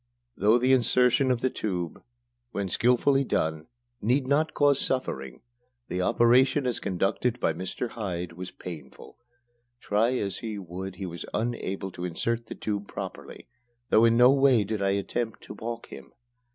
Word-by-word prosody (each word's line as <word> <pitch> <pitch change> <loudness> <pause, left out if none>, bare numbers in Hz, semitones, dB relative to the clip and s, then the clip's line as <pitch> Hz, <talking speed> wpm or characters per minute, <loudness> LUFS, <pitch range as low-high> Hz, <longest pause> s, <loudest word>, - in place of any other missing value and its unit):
Though 110 +3 +4
the 130 +2 +3
insertion 125 +1 +3
of 125 -2 +1
the 130 - +1
tube, 90 -5 -3 0.5
when 100 -4 -3
skilfully 125 +6 +3
done, 80 - -1 0.3
need 130 +5 +2
not 150 +4 +1
cause 145 -2 +4
suffering, 70 - -2 0.5
the 90 - -1
operation 125 +6 +4
as 125 -2 0
conducted 100 +6 -1
by 80 - +1
Mr. 95 +8 -4
Hyde 90 -6 -4
was 90 +2 -7
painful. 85 +4 -10 0.6
Try 115 +5 +1
as 100 -4 -3
he 110 -2 -5
would, 95 0 -6
he 95 - -5
was 85 -1 -6
unable 100 -4 -2
to 90 - -8
insert 115 +7 -2
the - - -7
tube 105 -1 -3
properly, - - -8 0.4
though 110 - +6
in 115 0 +4
no 125 +2 +7
way 135 -5 +4
did 105 +1 -3
I 100 - +2
attempt 105 +3 -2
to - - -9
balk 115 +2 -6
him. - - -11
110 Hz, 160 wpm, -27 LUFS, 95-125 Hz, 0.6 s, no